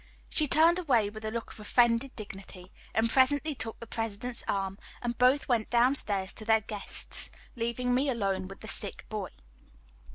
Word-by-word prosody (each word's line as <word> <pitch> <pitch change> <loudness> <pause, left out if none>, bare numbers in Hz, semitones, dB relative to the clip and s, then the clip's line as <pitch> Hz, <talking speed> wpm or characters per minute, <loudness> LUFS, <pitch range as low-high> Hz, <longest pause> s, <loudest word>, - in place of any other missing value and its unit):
She 305 - +3
turned 330 +5 +5
away 240 - +2
with 215 0 -9
a - - -1
look 230 +1 -5
of - - -12
offended 235 +4 +2
dignity, 195 -3 -10 0.2
and 225 +1 +3
presently 285 +5 +3
took 225 -4 -3
the 230 - -8
President's 225 +2 -3
arm, 195 0 -2 0.2
and 240 -1 -3
both 255 +4 +3
went 235 -4 +1
down 245 +3 +4
stairs 200 -7 0
to - - -6
their 220 0 +3
guests, 205 -1 -2 0.3
leaving 235 +1 -1
me 270 +3 +2
alone 195 -6 -1
with 195 - -11
the 220 - -8
sick 205 -2 0
boy. 210 -3 -4
230 Hz, 175 wpm, -29 LUFS, 205-250 Hz, 0.3 s, turned